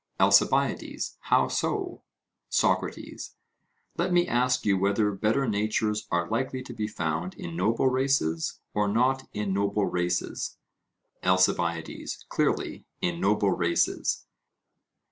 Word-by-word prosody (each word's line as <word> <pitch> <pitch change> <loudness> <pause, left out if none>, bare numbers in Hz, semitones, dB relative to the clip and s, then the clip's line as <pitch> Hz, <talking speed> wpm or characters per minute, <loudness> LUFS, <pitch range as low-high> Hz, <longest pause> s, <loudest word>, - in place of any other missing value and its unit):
ALCIBIADES: - - +2
How - - +4
so? 380 -4 -2 0.5
SOCRATES: - - -1 0.6
Let - - +1
me 175 0 +3
ask 125 +1 +1
you 100 -2 +4
whether 100 +2 +2
better 110 +7 +1
natures 105 0 0
are 85 0 0
likely 130 +4 -2
to 125 - -9
be 110 -2 -2
found 80 -2 -3
in 85 - -7
noble 110 +8 +2
races 130 - 0
or 105 0 +1
not 130 +5 +1
in 105 -2 -2
noble 100 +1 +1
races? 90 0 -2 0.6
ALCIBIADES: 90 -3 0
Clearly - - -1
in 85 -1 -1
noble 100 0 +3
races. 85 -1 0
105 Hz, 115 wpm, -27 LUFS, 90-125 Hz, 0.6 s, How